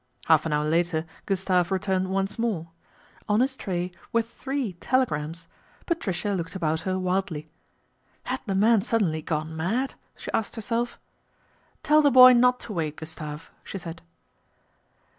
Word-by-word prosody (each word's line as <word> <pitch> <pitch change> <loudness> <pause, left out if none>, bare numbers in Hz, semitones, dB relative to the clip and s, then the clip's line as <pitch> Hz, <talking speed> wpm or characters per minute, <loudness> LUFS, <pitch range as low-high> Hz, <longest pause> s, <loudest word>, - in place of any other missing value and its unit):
Half 160 0 +4
an 155 - -1
hour 150 0 +1
later 165 0 +1 0.2
Gustave 185 -2 +1
returned 190 -1 0
once 195 +3 -1
more. 200 -8 -1 0.6
On 210 +1 +3
his 265 +2 +1
tray 180 -6 -3 0.2
were 230 0 +2
three 265 -1 -4
telegrams. 170 - -1 0.4
Patricia 205 - -1
looked 170 -1 -4
'about 160 -3 0
her 185 +2 -1
wildly. 180 -4 -2 0.4
" - - -40
Had - - -3
the 195 - 0
man 215 +2 +4
suddenly 195 -8 0
gone 155 0 -3
mad? 220 +12 -1
" - - -41
she - - -7
asked 220 - -1
herself. 230 +2 -2 0.4
" - - -37
Tell 305 +1 +5
the 290 - +5
boy 255 -1 +9
not 250 +1 +4
to 215 - -6
wait, 155 -4 -2
Gustave," 155 -1 -7 0.2
she - - -6
said. 165 -2 -8
190 Hz, 160 wpm, -26 LUFS, 165-230 Hz, 0.6 s, boy